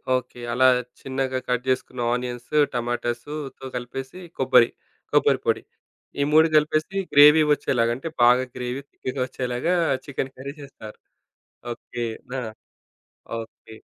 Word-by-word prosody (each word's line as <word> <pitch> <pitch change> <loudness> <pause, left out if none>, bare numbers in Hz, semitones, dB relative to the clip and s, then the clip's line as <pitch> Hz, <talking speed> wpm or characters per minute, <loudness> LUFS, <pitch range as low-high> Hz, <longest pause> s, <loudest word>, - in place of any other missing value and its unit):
Okay. 125 -1 -4
అలా 130 +1 +3 0.4
చిన్నగా 130 -1 -2
cut 125 0 +1
జేసుకున్న 130 -1 -1
onions, 125 +3 -3 0.2
టమాటాసుతో 120 +4 -4
కలిపేసి 130 +6 -6 0.2
కొబ్బరి, 125 -3 +5 0.4
కొబ్బరిపొడి. - - +2 0.6
ఈ - - +4
3 160 +1 +6
కలిపేసి, 155 +4 +2 0.2
గ్రేవీ 150 +2 +8
ఒచ్చేలాగా 120 -4 +1
అంటే, 135 - -6 0.2
బాగా 125 +2 +6
గ్రేవీ 125 +2 -4
థిక్‌గా 130 0 -5
ఒచ్చేలాగా 125 +8 -1 0.3
చికెను 135 -1 -4
కర్రీ 140 +2 -6
జేస్తారు. 120 -6 -11 0.8
ఓకే. 120 0 -6 0.3
నా 130 - -1 1.0
ఓకే. 110 0 -12
130 Hz, 110 wpm, -24 LUFS, 125-140 Hz, 1.0 s, గ్రేవీ